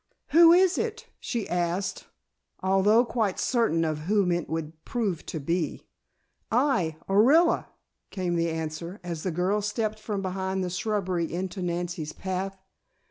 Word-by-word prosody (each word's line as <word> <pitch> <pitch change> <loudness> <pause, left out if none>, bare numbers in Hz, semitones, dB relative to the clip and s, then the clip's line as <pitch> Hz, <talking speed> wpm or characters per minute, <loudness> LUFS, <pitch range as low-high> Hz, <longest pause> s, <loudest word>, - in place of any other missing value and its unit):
"Who 330 +2 +8
is 365 +1 +5
it?" 455 0 -3
she 235 -3 -3
asked, 175 +2 -2 0.6
although 195 +5 +4
quite 220 -5 -1
certain 165 -10 +2
of 155 -1 -1
whom 200 -4 +3
it 175 -1 -1
would 160 0 -5
prove 205 -9 -2
to 160 - -4
be. 165 +2 -2 0.7
"I, 220 - +2
Orilla," 270 - +4 0.4
came 185 -3 -2
the 170 0 +1
answer, 160 +3 -5
as 170 -3 -4
the 185 - -2
girl 180 +5 0
stepped 215 +1 -2
from 205 -2 -3
behind 190 0 -2
the 180 - -3
shrubbery 185 -3 -1
into 185 +2 -4
Nancy's 175 -3 -3
path. 190 +1 -4
190 Hz, 140 wpm, -27 LUFS, 170-215 Hz, 0.7 s, Who